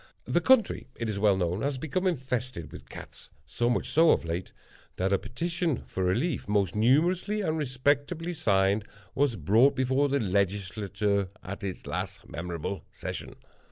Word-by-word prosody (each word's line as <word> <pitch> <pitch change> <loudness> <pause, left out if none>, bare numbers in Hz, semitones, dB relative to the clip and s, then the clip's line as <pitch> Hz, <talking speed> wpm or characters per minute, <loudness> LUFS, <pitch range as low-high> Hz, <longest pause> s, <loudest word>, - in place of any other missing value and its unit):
The - - +1
country, 260 -5 +3
it 115 - -3
is 100 -2 -2
well 100 -2 +4
known, 90 +2 -1
has 140 +1 -1
become 160 +7 -1
infested 125 - -2
with - - -11
cats—so 75 +11 -5
much 120 - 0
so 165 +1 +5
of - - +3
late, 85 +2 -3 0.4
that 95 +2 0
a 100 - +3
petition 165 - -2
for 95 - -3
relief, 120 - 0
most 100 -3 +1
numerously 175 - +2
and 160 -5 0
respectably 145 +4 0
signed, 100 - +2 0.3
was 140 -4 +2
brought 110 - +4
before 130 +2 +2
the 140 +1 +2
Legislature 100 0 0
at 100 +2 -7
its 95 -3 -5
late - - -3
memorable 85 +3 -4
session. - - -6
115 Hz, 155 wpm, -28 LUFS, 95-145 Hz, 0.4 s, so